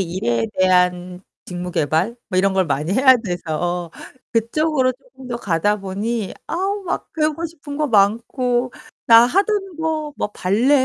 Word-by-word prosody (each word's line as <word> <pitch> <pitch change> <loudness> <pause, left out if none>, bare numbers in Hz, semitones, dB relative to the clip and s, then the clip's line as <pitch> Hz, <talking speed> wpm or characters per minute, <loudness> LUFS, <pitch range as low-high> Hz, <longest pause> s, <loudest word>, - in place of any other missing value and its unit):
일에 120 -11 -1
대한 180 -1 +2 0.2
직무 180 0 -6
개발 165 - 0
뭐 185 - 0
이런 195 +1 +3
걸 190 -1 +2
많이 150 +4 -1
해야 260 +3 +6
돼서 175 -4 -3 0.4
그쪽으로 255 +4 +1
쪼금 260 0 -15
더 240 - -3
가다 205 -1 0
보니 205 +2 -3
아우 390 +4 -2
막 350 - -4
배우고 310 +1 -1
싶은 295 -3 -9
거 300 0 0
많고 240 +4 +1 0.3
나 230 0 +8
하던 390 - 0
거 315 -2 -2
막 210 - -3
발레 250 +10 +2
230 Hz, 260 characters per minute, -20 LUFS, 180-285 Hz, 0.4 s, 나